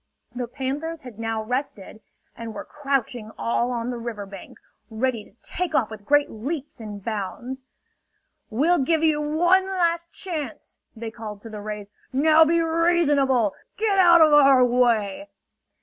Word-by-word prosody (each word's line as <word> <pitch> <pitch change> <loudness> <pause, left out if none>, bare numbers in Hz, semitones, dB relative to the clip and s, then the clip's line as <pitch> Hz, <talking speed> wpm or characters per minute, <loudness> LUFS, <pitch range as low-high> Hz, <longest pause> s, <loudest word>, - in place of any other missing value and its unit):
The 245 -1 -4
panthers 285 +6 -4
had 240 -4 -11
now 225 -1 -2
rested, 220 -3 -4 0.3
and 230 -2 -7
were - - -6
crouching 270 -6 -2
all 235 +1 0
on 240 0 -2
the 240 - -5
river 230 -3 -5
bank, 195 -1 -11 0.3
ready 230 0 -1
to 200 - -22
take 345 -3 -3
off 220 -6 +1
with 210 -2 -10
great 290 0 +4
leaps 275 +5 -5
and 205 -3 -8
bounds. 230 +5 -4 0.9
"We'll 310 +10 +2
give 320 +4 +1
you 310 -2 +3
one 350 +6 +3
last 340 -3 0
chance!" 310 - -7 0.2
they 225 0 -6
called 215 -2 -8
to 225 - -10
the 210 -1 -7
rays. 210 -1 -6 0.2
"Now 310 +4 +5
be 335 +2 +2
reasonable! 295 - +2 0.2
Get 415 -2 +1
out 345 -2 +7
of 310 -1 +6
our 275 -3 +7
way!" 240 +1 +1
260 Hz, 155 wpm, -24 LUFS, 225-315 Hz, 0.9 s, out